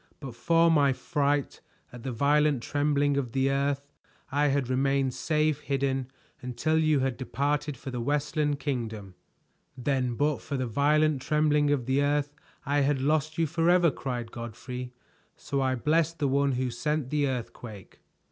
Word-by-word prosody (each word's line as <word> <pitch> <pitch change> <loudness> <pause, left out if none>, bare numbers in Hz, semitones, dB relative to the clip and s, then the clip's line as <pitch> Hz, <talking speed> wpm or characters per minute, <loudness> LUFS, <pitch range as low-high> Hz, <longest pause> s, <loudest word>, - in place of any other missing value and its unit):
But 135 -4 -7
for 165 +6 +3
my 140 -4 +4
fright 145 -1 -1 0.3
at 125 - -9
the 130 +2 -4
violent 145 +1 +2
trembling 145 -1 +1
of 125 -5 -2
the 135 0 +2
earth 140 +1 -1 0.4
I 145 +2 +2
had 140 -2 +1
remained 135 0 +1
safe 155 0 0
hidden 135 -2 -1 0.3
until 125 +6 0
you 155 -3 +3
had 130 -2 -1
departed 145 +2 -2
for 135 - -7
the 125 -1 -3
Westland 145 +2 0
Kingdom." 110 -9 -4 0.6
"Then 125 -1 -1
but 145 +3 0
for 140 - -4
the 130 - -1
violent 145 +4 +2
trembling 150 0 +2
of 140 -4 +1
the 130 +2 +1
earth, 145 0 0 0.3
I 145 0 +1
had 140 0 +2
lost 150 +2 0
you 165 - +2
forever!" 170 +2 +3
cried 120 -5 -5
Godfrey. 125 +2 -7 0.4
"So 140 -1 -3
I 130 -1 +1
bless 155 +5 +2
the 150 -4 -1
one 140 0 +2
who 125 0 -1
sent 150 +2 -2
the 145 -1 +1
earthquake." 120 -5 -7
140 Hz, 160 wpm, -28 LUFS, 130-150 Hz, 0.6 s, my